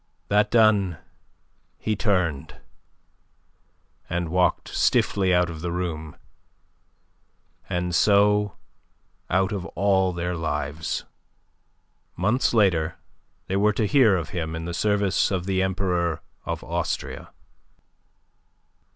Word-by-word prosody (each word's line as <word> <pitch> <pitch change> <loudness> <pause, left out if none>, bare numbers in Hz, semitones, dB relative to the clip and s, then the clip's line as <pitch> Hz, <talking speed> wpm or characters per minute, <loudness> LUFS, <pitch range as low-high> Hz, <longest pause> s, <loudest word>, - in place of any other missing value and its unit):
That 105 +1 +3
done 105 -7 +3 0.8
he 110 - -1
turned 90 -10 -1 1.5
and 85 -1 -2
walked 90 +2 +1
stiffly 95 -2 +2
out 90 0 +3
of 80 -2 -7
the 85 0 -3
room, 80 -4 -4 1.5
and 90 -1 -2
so 105 +1 +3 0.7
out 95 +2 +1
of 100 -4 -3
all 95 -2 +2
their 90 0 -3
lives. 80 -1 -3 1.1
Months 105 +9 +1
later 90 -8 +2 0.5
they 95 - -1
were 105 +1 +3
to 105 - 0
hear 110 -1 +4
of 85 -3 -4
him 80 -2 -4
in 80 0 -5
the 85 - -4
service 100 +1 +1
of 90 -3 -2
the 95 -1 0
Emperor 90 -4 -1 0.2
of - - -4
Austria. - - -3
90 Hz, 110 wpm, -24 LUFS, 85-100 Hz, 1.5 s, hear